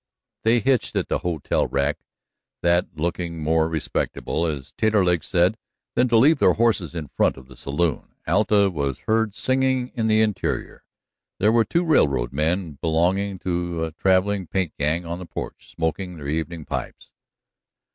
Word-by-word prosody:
They 115 +2 +4
hitched 130 0 +1
at - - -1
the - - 0
hotel 85 -5 -1
rack, 70 +1 0 0.6
that 85 +1 +3
looking 85 0 -3
more 80 +1 +2
respectable, 80 +1 -2
as 70 -3 -5
Taterleg 95 -7 +2
said, 90 +5 +2 0.3
than 125 - +3
to 115 -2 +3
leave 140 +6 +5
their - - +5
horses 105 -7 +1
in 75 -4 -5
front - - +2
of 65 - -12
the 65 0 -15
saloon. 75 +3 -2
Alta 100 +2 +3
was 70 -5 -3
heard 110 -2 0
singing 130 -1 +1
in 115 -2 -1
the 110 0 +4
interior; 105 -3 -2 0.5
there 105 +3 +3
were 115 -1 +4
two 170 +9 +1
railroad 70 - +2
men 80 +1 -1
belonging 90 +4 +1
to 85 -2 -1
a 80 - -3
traveling 95 +2 +1
paint 95 -3 -1
gang 80 +4 0
on 85 +1 -5
the 90 - -7
porch - - -7
smoking 85 +2 -3
their 70 -2 -7
evening 80 +1 -3
pipes. 65 -3 -6
85 Hz, 160 wpm, -23 LUFS, 80-105 Hz, 0.6 s, leave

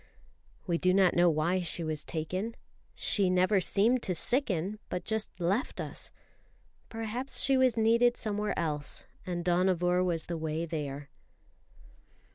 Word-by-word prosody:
We 170 -2 0
do 185 0 +3
not 190 -2 +4
know 175 0 +4
why 165 +4 +1
she 170 -1 -1
was 155 -2 -3
taken. 185 +8 -3 0.4
She 195 -3 +2
never 185 +2 +3
seemed 225 +7 +2
to 185 - -1
sicken, 205 - 0
but 180 - -3
just 220 -4 -3
left 195 - -1
us; - - -3 0.8
perhaps 225 +4 -3
she 270 - +4
was 260 -3 +3
needed 235 +2 +4
somewhere 210 -1 -2
else, 150 -3 -2 0.2
and 175 -1 -3
Dohnavur 180 0 +2
was 170 -3 -1
the 170 - -4
way 160 +1 -2
there. 145 -3 -5
185 Hz, 140 wpm, -30 LUFS, 170-220 Hz, 0.8 s, not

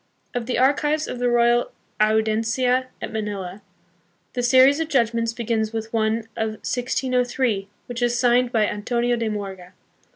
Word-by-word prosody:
Of 240 -1 -3
the 250 - -1
archives 295 +4 +2
of 245 - -5
the 245 0 +1
Royal 240 0 +3 0.3
Audiencia 225 +4 +2 0.2
at - - -5
Manila, 205 -3 -4 0.7
the 245 - -1
series 260 +4 +5
of 325 - -1
judgments 230 -4 +1
begins 225 -1 -2
with 225 0 -5
one 220 0 +1
of 220 -1 -2
1603, 250 -4 0 0.2
which 245 -1 -6
is 240 0 +1
signed 245 0 +3
by 220 -4 +3
Antonio 240 +4 0
de 230 -2 -2
Morga. 195 -3 -6
235 Hz, 150 wpm, -23 LUFS, 220-250 Hz, 0.7 s, series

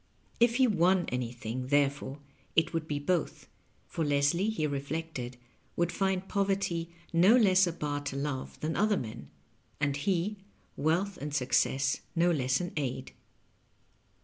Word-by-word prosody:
If 235 0 +4
he 260 0 +5
won 185 -4 +3
anything, 125 0 -4
therefore, 140 -1 +1 0.4
it 165 +1 +3
would 165 -1 -2
be 150 - -1
both; 170 +3 -1 0.4
for 165 - -3
Leslie, 145 +7 +2
he 215 -8 -1
reflected, 140 -3 -4 0.4
would 175 0 +1
find 190 -1 0
poverty 195 -4 0 0.2
no 180 +7 +6
less 190 -6 +5
a - - 0
bar 145 -3 -3
to 140 - -3
love 140 -1 -4
than 160 +1 -1
other 210 -1 +3
men: 115 -3 -6 0.5
and 145 -2 +1
he, 185 +6 0 0.4
wealth 175 +7 0
and 145 0 -4
success 135 0 +2 0.2
no 175 +1 +4
less 130 -4 +1
an 180 -1 -3
aid. 130 -2 -3
160 Hz, 145 wpm, -30 LUFS, 140-185 Hz, 0.5 s, no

